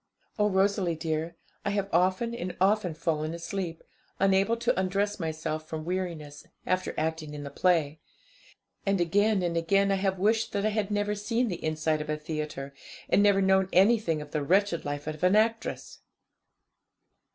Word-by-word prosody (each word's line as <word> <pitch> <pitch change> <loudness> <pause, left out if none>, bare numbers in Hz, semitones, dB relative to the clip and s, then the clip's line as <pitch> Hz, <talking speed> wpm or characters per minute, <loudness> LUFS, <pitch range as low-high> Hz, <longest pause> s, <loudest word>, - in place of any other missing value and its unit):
Oh, 210 0 +3
Rosalie 190 -2 +1
dear, 160 +1 -3 0.3
I - - -1
have 200 -1 -1
often 185 +7 +2
and 180 -6 -5
often 190 -3 +2
fallen 155 0 -1
asleep, 170 0 -5 0.4
unable 195 +4 +3
to 230 - 0
undress 200 +2 0
myself 155 -1 -3
from 155 -1 -5
weariness, 170 -5 -4 0.2
after 185 0 -1
acting 155 -1 -2
in 145 - -6
the 140 - -7
play; 160 -4 +1 0.8
and 195 -1 +1
again 200 +3 +2
and 170 -1 -1
again 195 +4 +2
I 195 - +2
have 190 -1 0
wished 220 +4 +1
that 200 0 0
I - - +3
had 210 -1 -1
never 205 0 0
seen 230 +4 -1
the 175 - -5
inside 155 0 0
of 150 - -7
a 155 - 0
theatre, 150 -3 -5 0.4
and - - +4
never 200 -1 +4
known 190 0 +3
anything 190 -6 +3
of 145 - -15
the 150 - -1
wretched 185 +3 +1
life 145 0 -4
of 155 0 -5
an 185 +2 +4
actress! 225 +1 0
185 Hz, 170 wpm, -28 LUFS, 155-200 Hz, 0.8 s, and